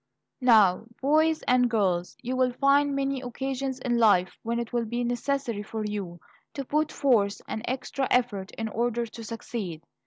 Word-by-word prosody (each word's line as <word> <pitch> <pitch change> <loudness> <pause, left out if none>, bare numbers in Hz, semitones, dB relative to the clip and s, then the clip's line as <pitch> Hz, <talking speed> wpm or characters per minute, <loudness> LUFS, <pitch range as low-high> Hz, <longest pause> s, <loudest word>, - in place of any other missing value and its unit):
Now, 220 -6 +5
boys 310 +3 +2
and 250 -1 +3
girls, 185 -6 0
you 255 +1 -2
will 255 -1 +2
find 280 +2 +3
many 275 -1 -1
occasions 265 +1 -3
in 240 -2 0
life 200 -5 +4
when 235 +1 -2
it 235 0 -4
will 240 -1 0
be 240 +2 -2
necessary 245 -2 -1
for 215 +1 -5
you 195 -5 -4 0.4
to 275 - -4
put 305 +3 0
forth 225 -8 +2
an 220 - -4
extra 260 +1 -2
effort 215 -6 +1
in 225 - -3
order 235 +2 -1
to 230 0 -10
succeed. 215 -7 -5
240 Hz, 165 wpm, -27 LUFS, 215-265 Hz, 0.4 s, Now